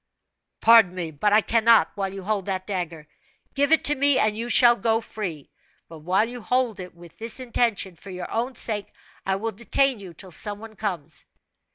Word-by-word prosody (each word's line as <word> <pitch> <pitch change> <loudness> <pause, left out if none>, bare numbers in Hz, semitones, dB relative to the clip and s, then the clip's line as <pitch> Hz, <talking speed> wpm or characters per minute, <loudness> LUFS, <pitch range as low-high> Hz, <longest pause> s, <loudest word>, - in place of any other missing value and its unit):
"Pardon 225 -5 +6
me, 170 -3 -4
but 155 +8 0
I 215 +1 +5
cannot, 230 +1 +3
while 195 -1 -3
you 195 0 -8
hold 205 -1 -2
that 185 -1 -3
dagger. 170 -6 -5 0.5
Give 285 +2 +1
it 320 - +4
to 295 - +5
me, 285 -1 +3
and 215 -1 +2
you 230 +2 -4
shall 240 -1 +6
go 225 -1 +1
free; 185 -10 -7 0.4
but 165 -1 -12
while 185 +7 +1
you 245 0 -8
hold 250 -3 -1
it 180 -1 -9
with 170 -1 -16
this 230 +2 -1
intention, 230 -7 -1
for 195 - -14
your 180 -1 -7
own 245 +3 -2
sake, 210 -3 0 0.4
I 190 - +1
will 225 +3 -3
detain 235 +4 +1
you 185 -4 -11
till 185 +3 -7
some 205 +5 -3
one 220 +1 -12
comes." 175 -9 -4
210 Hz, 200 wpm, -24 LUFS, 185-235 Hz, 0.5 s, Pardon